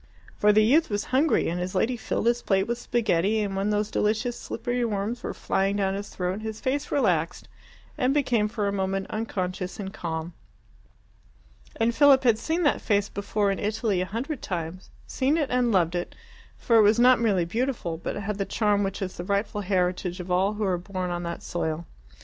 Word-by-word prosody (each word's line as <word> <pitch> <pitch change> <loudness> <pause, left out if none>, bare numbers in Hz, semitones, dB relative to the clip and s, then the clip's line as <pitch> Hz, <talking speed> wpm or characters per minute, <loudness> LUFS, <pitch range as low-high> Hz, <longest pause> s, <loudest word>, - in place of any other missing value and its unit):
For 210 - +4
the 215 +1 +5
youth 300 +9 +4
was 205 -1 -1
hungry, 285 +4 +3
and 175 +2 -2
his 180 +2 -4
lady 230 +7 +1
filled 225 - -3
his 240 +1 +2
plate 195 -1 +2
with 235 +2 -3
spaghetti, 215 -3 +1
and 200 -2 -2
when 195 +2 0
those 210 0 0
delicious 220 +3 0
slippery 240 +2 -3
worms 220 +2 -2
were - - -4
flying 195 +1 0
down 195 -1 0
his 200 +1 -5
throat, 185 +3 -3
his 220 0 -5
face 280 +2 -1
relaxed 180 - 0 0.5
and 255 -1 +2
became 250 -7 +2
for 210 -1 -2
a - - 0
moment 195 0 -1
unconscious 185 -4 -3
and 195 -1 -5
calm. 165 0 -4 1.4
And 230 +1 +1
Philip 280 0 +6
had 230 -3 +4
seen 330 +2 -1
that 290 - +2
face 205 -1 +1
before 200 0 -1
in 195 - -3
Italy 210 -2 0
a - - 0
hundred 250 +7 -4
times 175 0 -5 0.2
seen 275 +4 +1
it 295 -4 -1
and 250 -1 +2
loved 175 -4 +2
it, 175 0 -4 0.4
for 230 - +3
it - - +8
was 210 +1 +5
not 250 0 +6
merely 195 -7 +2
beautiful, 225 -4 -2
but - - -4
had 205 0 -4
the - - +2
charm 210 -1 +1
which 195 0 -2
is 185 - -6
the 175 - -4
rightful 200 +2 -1
heritage 180 -1 -1
of 180 0 -6
all 190 +3 +2
who 210 0 -3
are 185 -3 +1
born 185 0 -4
on 175 0 -2
that 170 0 -5
soil. 165 -1 -3
205 Hz, 200 wpm, -26 LUFS, 185-235 Hz, 1.4 s, it